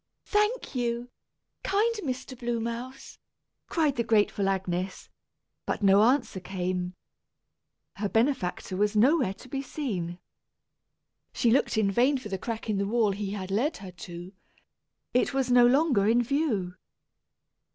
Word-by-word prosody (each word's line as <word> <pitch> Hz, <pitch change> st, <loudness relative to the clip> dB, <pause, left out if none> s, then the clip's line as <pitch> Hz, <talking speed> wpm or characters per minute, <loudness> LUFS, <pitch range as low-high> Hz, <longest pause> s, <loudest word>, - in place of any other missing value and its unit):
"Thank 420 Hz, 0 st, 0 dB
you, 240 Hz, -1 st, -2 dB, 0.5 s
kind 425 Hz, +4 st, +2 dB
Mr. 260 Hz, -7 st, -4 dB
Blue 240 Hz, -1 st, -2 dB
Mouse," 235 Hz, +3 st, -6 dB, 0.5 s
cried 305 Hz, -6 st, +1 dB
the 235 Hz, -, +2 dB
grateful 205 Hz, -3 st, +2 dB
Agnes; 185 Hz, -1 st, -3 dB, 0.6 s
but -, -, -2 dB
no 195 Hz, +1 st, +6 dB
answer 245 Hz, -3 st, +2 dB
came. 180 Hz, -1 st, -3 dB, 1.0 s
Her 205 Hz, 0 st, -1 dB
benefactor 225 Hz, -6 st, 0 dB
was 210 Hz, +2 st, +1 dB
nowhere 245 Hz, -, +3 dB
to 255 Hz, -, -14 dB
be 270 Hz, +1 st, -3 dB
seen. 200 Hz, -, -4 dB, 1.2 s
She 235 Hz, -, +2 dB
looked 245 Hz, -2 st, +2 dB
in 205 Hz, -2 st, +2 dB
vain 255 Hz, +7 st, +3 dB
for 250 Hz, -5 st, -8 dB
the 190 Hz, -1 st, -3 dB
crack 225 Hz, +2 st, -5 dB
in 210 Hz, -3 st, 0 dB
the 200 Hz, -, 0 dB
wall 220 Hz, -1 st, +2 dB
he 200 Hz, 0 st, -3 dB
had 190 Hz, -2 st, -5 dB
led 255 Hz, +11 st, 0 dB
her 190 Hz, -2 st, -9 dB
to; 175 Hz, +2 st, -9 dB, 0.8 s
it 250 Hz, +2 st, +2 dB
was 260 Hz, -2 st, +1 dB
no 245 Hz, 0 st, +7 dB
longer 260 Hz, -6 st, +3 dB
in 235 Hz, +2 st, +4 dB
view. 235 Hz, -, 0 dB
230 Hz, 140 wpm, -28 LUFS, 195-260 Hz, 1.2 s, no